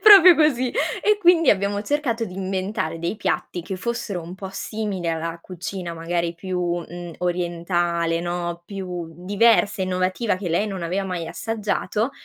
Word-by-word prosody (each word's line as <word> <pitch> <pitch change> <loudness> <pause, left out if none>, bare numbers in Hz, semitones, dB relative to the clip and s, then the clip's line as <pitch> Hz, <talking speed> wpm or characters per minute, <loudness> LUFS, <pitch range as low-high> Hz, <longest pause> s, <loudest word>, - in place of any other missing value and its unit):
Proprio 390 -5 +10
così, 260 -5 +3
e 420 +10 +1
quindi 345 -5 +6
abbiamo 200 +1 +1
cercato 240 -3 0
di 180 - -8
inventare 190 -3 -2
dei 170 +6 -2
piatti 180 - -1
che 190 +2 -5
fossero 230 -3 -3
un 170 +2 -8
po' 190 -1 -7
simili 200 -4 -3
alla 165 +1 -2
cucina 180 -1 -5
magari 170 +1 -1
più, 185 +2 -4 0.2
mhmm, 175 0 -8
orientale, 175 -1 0
no, 175 0 -3
più 180 -3 -5 0.2
diversa 205 0 +4
e - - +2
innovativa 185 +3 0
che 185 -2 -4
lei 175 +6 +1
non 190 -3 -4
aveva 185 +4 -1
mai 180 -3 -3
assaggiato 215 +5 -1
185 Hz, 155 wpm, -23 LUFS, 175-215 Hz, 0.2 s, Proprio